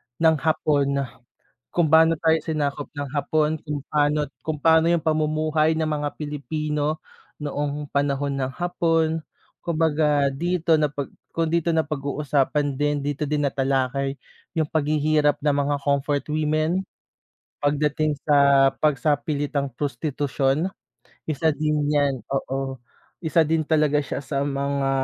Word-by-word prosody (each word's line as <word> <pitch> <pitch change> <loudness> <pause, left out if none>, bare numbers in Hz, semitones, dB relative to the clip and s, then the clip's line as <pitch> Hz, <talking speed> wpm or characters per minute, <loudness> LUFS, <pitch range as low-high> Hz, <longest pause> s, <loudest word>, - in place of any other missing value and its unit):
ng 160 +3 +4
Hapon. 140 -3 +1 0.7
Kung 175 -2 +2
paano 160 +1 +5
tayo 160 0 +3
sinakop 145 -2 -2
ng 145 - -2
Hapon, 150 +1 +1
kung 150 -1 -3
paano 150 0 +2 0.2
kung 155 -2 -3
paano 160 +2 +4
'yong 170 -2 +2
pamumuhay 155 0 +1
ng 160 - 0
mga 150 -1 -1
Pilipino, 150 +1 -2 0.4
noong 145 0 -3
panahon 140 0 0
ng 130 - -1
Hapon. 165 -2 +1 0.4
Kumbaga 150 -4 +1
dito 170 +2 +1
na 150 -1 +2
pag 140 -1 -4 0.2
kung 165 0 -1
dito 170 +1 +1
na 160 -2 +1
pag-uusapan 145 -1 0
din, 145 +1 0
dito 145 +1 -3
din 150 0 0
natalakay 135 0 0 0.4
'yong 155 - +2
paghihirap 150 -1 +1
ng 145 -1 +2
mga 145 +1 0
comfort 140 0 0
women, 155 +4 0 0.7
pagdating 150 +1 +1
sa 140 -2 +5
pagsapilitang 145 0 0
prostitusyon. 145 +2 -1 0.6
Isa 155 +1 +1
din 150 0 0
yan, 140 -3 +1
oo, 135 0 -2 0.5
isa 160 +1 +3
din 160 +1 +1
talaga 150 -1 +2
siya 135 - -4
sa 140 0 -3
mga 140 -1 -1
150 Hz, 125 wpm, -24 LUFS, 140-155 Hz, 0.7 s, paano